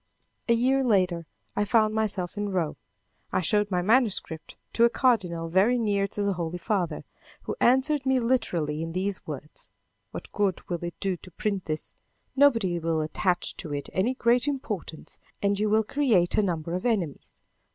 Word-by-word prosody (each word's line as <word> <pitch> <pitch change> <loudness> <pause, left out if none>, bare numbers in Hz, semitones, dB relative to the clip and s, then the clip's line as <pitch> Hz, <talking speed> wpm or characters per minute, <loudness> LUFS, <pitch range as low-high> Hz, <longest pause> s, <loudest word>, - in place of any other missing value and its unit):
A - - +6
year 265 +3 +2
later, 185 -8 +1 0.3
I 205 - +2
found 215 0 +3
myself 205 -5 -2
in 205 0 -2
Rome. 180 -5 -1 0.6
I - - +1
showed 205 +3 +2
my 180 -2 0
manuscript 205 -7 +1 0.2
to 230 - +3
a 235 - +7
cardinal 190 -11 +1
very 195 +9 +3
near 205 -4 +1
to 205 - -4
the 200 -1 +1
Holy 175 -1 -3
Father, 175 -5 -1 0.4
who - - -4
answered 265 +4 +3
me 265 -1 +2
literally 175 -11 0
in 165 0 -4
these 190 +2 -3
words: 150 0 -7 0.4
"What - - -8
good 200 -3 -1
will 175 -1 -3
it 175 0 -6
do 195 -2 -1
to 185 - -14
print 195 +1 -3
this? 155 -1 -4 0.4
Nobody 230 -11 +3
will 165 -1 0
attach 175 +3 -1
to 155 - -6
it 140 - -5
any 230 +8 +1
great 245 +2 +2
importance 215 - -4 0.2
and 200 0 +1
you 210 0 +1
will 220 +1 +3
create 220 -9 +2
a - - +4
number 170 -4 -2
of 180 - -2
enemies. 195 - -2
200 Hz, 175 wpm, -27 LUFS, 175-230 Hz, 0.6 s, a